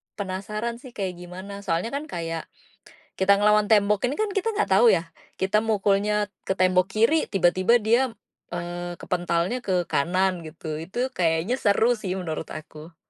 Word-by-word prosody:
penasaran 210 +4 -4
sih 255 0 -12
kayak 185 -3 -4
gimana. 185 +3 -8
Soalnya 185 +4 -1
kan 285 +2 -4
kayak 165 - -4 0.7
kita 190 +1 +5
ngelawan 210 0 +4
tembok 210 0 +4
ini 250 - -1
kan 430 -1 +1
kita 400 +3 -1
enggak 305 - 0
tahu 235 +2 +7
ya, 165 -2 -1 0.3
kita 190 +3 +2
mukulnya 210 -1 +1 0.2
ke - - 0
tembok 185 0 +3
kiri, 230 +9 +3
tiba-tiba 185 +4 +3
dia, 230 +4 +3 0.5
eee, 175 0 -4
kepentalnya 175 +6 -1
ke 180 -3 0
kanan 185 +4 +1
gitu. 155 -1 -6
Itu 240 +10 -2
kayaknya 170 +5 +1
seru 220 +3 +3
sih 195 -4 -3
menurut 160 -3 -4
aku. 155 +1 -10
190 Hz, 155 wpm, -25 LUFS, 175-215 Hz, 0.7 s, tahu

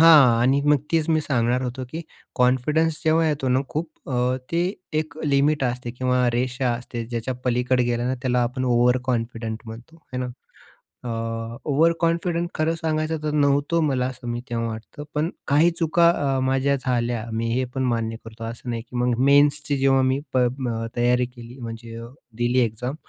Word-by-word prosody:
हां. 145 -8 +7
आणि 135 +3 +3
मग 150 0 +5 0.2
तेच 160 -1 +2
मी 155 -1 +3
सांगणार 125 -3 +1
होतो 130 +1 -4
की 160 - -4 0.3
कॉन्फिडन्स 150 +6 +2
जेव्हा 160 +1 +3
येतो 140 -3 -1
ना 130 +1 +3
खूप 160 +1 -6
अ, 125 0 +1 0.2
ते 170 +1 +2 0.3
एक 155 -1 -8
लिमिट 145 0 +2
असते 125 0 -2
किंवा 125 0 +1
रेषा 125 +1 0
असते 120 -1 -5
ज्याच्या 120 +2 -3
पलीकडे 125 0 +2
गेलं 120 0 0
ना, 130 - 0
त्याला 125 -2 +2
आपण 125 +2 -2
ओव्हरकॉन्फिडंट 120 -2 +1
म्हणतो. 115 +8 -10 0.2
हे 125 - -2
ना. 125 - -2 0.8
अ, 115 0 -3
ओव्हरकॉन्फिडंट 170 +3 +2
खरं 160 +1 +1
सांगायचं 160 -1 -1
तर, 150 - -1
नव्हतो 145 +2 +2
मला 135 -4 +1
असं 125 -2 -8
मी 120 0 -2
तेव्हा 115 -1 -1
वाटत, 110 +5 -7
पण 155 +3 +1 0.2
काही 155 +5 +4
चुका 170 +1 +4
अ, 140 -5 +1
माझ्या 135 +1 +2
झाल्या 120 -3 -1
मी 115 +1 -1
हे 130 +1 +1
पण 130 - 0
मान्य 115 -2 -1
करतो 115 0 -9
असं 115 +2 -6
नाही 115 -1 -2
की 125 - -14
मग 125 0 +2
मेन्सची 145 0 +4
जेव्हा 135 0 +4
मी 130 +1 +2
प - - +2
अ, 125 -2 0
तयारी 125 +1 +3
केली, 120 0 -12
म्हणजे 115 -1 -7 0.4
दिली 120 +1 +2
एक्झाम. 125 +3 -1
125 Hz, 175 wpm, -23 LUFS, 120-145 Hz, 0.8 s, हां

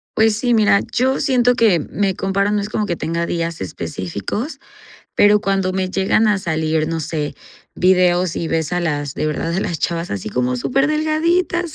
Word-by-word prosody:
Pues 220 -1 +3
sí 245 0 +1
mira, 210 -2 +4
yo 260 +2 +1
siento 250 -3 +3
que 210 -8 +4
me 190 +5 -2
comparo, 195 +1 0
no 210 - +1
es 205 +1 -4
como 210 -1 -1
que 175 - -1
tenga 170 +1 -2
días 165 -1 -3
específicos, 95 - -5 0.6
pero 205 0 +5
cuando 195 -2 0
me 185 -1 -2
llegan 195 +3 +2
a 210 -1 +2
salir, 160 -3 -1
no 165 0 -2
sé, 150 -1 -3 0.4
vídeos 180 -1 +2
y 165 - -2
ves 160 +1 -1
a 180 - +1
las 145 -5 -2
de - - -2
verdad 165 +2 -2
a - - 0
las 170 -7 -2
chavas 170 0 -2
así 100 +1 -4
como 125 +2 -1
súper 270 - +1
delgaditas 325 +3 0
185 Hz, 190 wpm, -19 LUFS, 160-220 Hz, 0.6 s, pero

